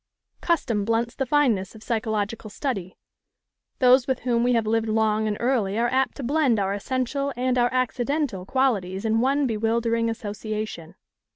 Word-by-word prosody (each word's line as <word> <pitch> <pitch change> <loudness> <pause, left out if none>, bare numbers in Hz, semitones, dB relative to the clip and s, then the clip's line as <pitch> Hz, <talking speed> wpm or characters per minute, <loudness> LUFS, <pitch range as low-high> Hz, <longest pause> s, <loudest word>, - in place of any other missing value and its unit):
Custom 240 - 0
blunts 230 +2 0
the 270 - -3
fineness 235 -11 +1
of 220 - -12
psychological 220 -1 -2
study: 200 -6 -4 0.8
those 255 0 +5
with 260 -2 -1
whom 240 -2 +1
we 245 0 +3
have 230 -2 +1
lived 225 +1 +1
long 215 0 +1
and 210 -1 -1
early 230 -5 0
are 240 +1 +2
apt 265 +1 +1
to 280 - -5
blend 270 -4 +2
our 195 0 0
essential 260 +6 -2
and 255 0 +1
our 245 -1 +2
accidental 255 -3 -1
qualities 200 -5 0
in 220 +1 +2
one 275 +3 +2
bewildering 230 0 0
association. 215 -5 -5
230 Hz, 160 wpm, -24 LUFS, 215-255 Hz, 0.8 s, those